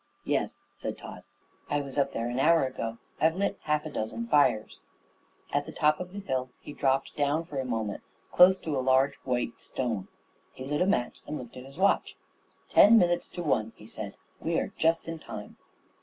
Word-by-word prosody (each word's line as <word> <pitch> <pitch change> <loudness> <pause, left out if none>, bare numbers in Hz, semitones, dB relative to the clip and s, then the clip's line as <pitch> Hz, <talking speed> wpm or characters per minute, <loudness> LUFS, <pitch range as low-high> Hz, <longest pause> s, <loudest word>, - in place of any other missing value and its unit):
"Yes," - - 0 0.2
said - - -5
Tod. - - -9 0.5
"I 145 - +1
was 140 -2 -8
up 140 0 +2
there 115 - -2
an 120 +2 -2
hour 165 +1 +5
ago. 115 -3 -4 0.2
I've 160 +1 +3
lit 200 +1 -1
half 150 0 +1
a 155 - -5
dozen 145 - -3
fires." 145 - +2 0.7
At - - 0
the - - -6
top 150 0 +2
of 180 0 -6
the 200 +1 -6
hill 130 -8 -2
he 150 - -9
dropped 135 -1 0
down 150 +3 +1
for 145 -5 -5
a 130 - -2
moment 110 -4 -2 0.3
close 185 +1 +7
to 155 -3 -2
a 130 - +1
large 130 +2 +3
white 125 -2 -2
stone. 115 -7 -2 0.5
He 130 - -8
lit 150 +3 -1
a 180 - +3
match 160 -12 0
and 150 - -3
looked 120 -3 -9
at 125 0 -9
his 135 +2 -13
watch. 200 +2 +2 0.6
"Ten 225 +3 +8
minutes 175 -3 +2
to 175 - -5
one," 115 -8 0
he 105 - -14
said. 110 -2 -7 0.2
"We're 165 0 -1
just 165 +1 +2
in 165 -1 -5
time." 105 -8 -9
140 Hz, 200 wpm, -29 LUFS, 125-165 Hz, 0.7 s, Ten